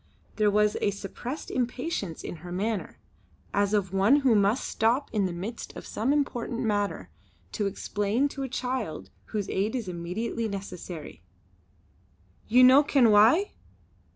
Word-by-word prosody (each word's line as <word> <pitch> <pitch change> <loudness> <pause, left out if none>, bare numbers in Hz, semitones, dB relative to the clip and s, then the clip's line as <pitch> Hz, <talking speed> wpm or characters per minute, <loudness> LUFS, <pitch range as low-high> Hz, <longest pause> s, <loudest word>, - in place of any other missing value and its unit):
There 210 -1 +4
was 210 0 +2
a - - +2
suppressed 220 +8 -6
impatience 250 - -3
in - - -6
her 175 +3 -10
manner, 205 +3 -2 0.6
as 200 0 +2
of 195 -3 0
one 210 +10 +4
who 260 -4 +4
must 210 +4 +2
stop 240 +6 +1
in 205 -3 +1
the - - -4
midst 195 +7 -6
of - - -9
some 230 +6 -1
important 245 -5 -1
matter 205 - -1 0.4
to 205 - -1
explain 205 +6 0
to 275 - -7
a 265 - -3
child 250 -7 -4
whose 210 -3 -3
aid 205 +5 -1
is 235 -6 -3
immediately 185 +7 -3
necessary: 180 - -7 1.3
"Ye 250 +3 +6
no 260 +3 +8
ken 270 -6 +4
why? 230 - +5
215 Hz, 150 wpm, -27 LUFS, 195-250 Hz, 1.3 s, no